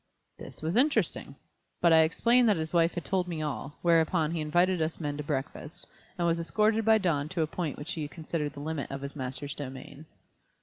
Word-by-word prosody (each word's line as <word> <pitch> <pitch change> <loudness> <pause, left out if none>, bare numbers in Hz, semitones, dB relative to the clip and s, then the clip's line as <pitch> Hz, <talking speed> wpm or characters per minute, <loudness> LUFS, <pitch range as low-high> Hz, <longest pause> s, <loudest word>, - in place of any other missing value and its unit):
This - - -10
was 160 +4 -1
interesting. 280 +5 +1 0.4
But 170 -1 +5
I 160 - +7
explained 235 +9 +4
that 205 - +3
his 160 0 -3
wife 170 0 +3
had 175 -4 -4
told 180 +4 0
me 165 -3 -3
all, 145 0 -5
whereupon 165 -1 +3
he 165 -2 -2
invited 175 +3 +2
us 160 +1 -2
men 145 -3 -3
to 150 - -4
breakfast, 145 +2 -4 0.3
and 175 - 0
was 170 0 +2
escorted 215 +6 +1
by 220 0 +5
Don 160 -7 0
to 170 -2 0
a - - +1
point 160 -1 -4
which 150 +4 -5
he 155 -3 -3
considered 155 -1 -4
the 140 - -8
limit 155 -1 -3
of 135 0 -5
his 140 +1 -6
master's 130 +1 -2
domain. 140 +2 -8
160 Hz, 210 wpm, -29 LUFS, 145-175 Hz, 0.4 s, I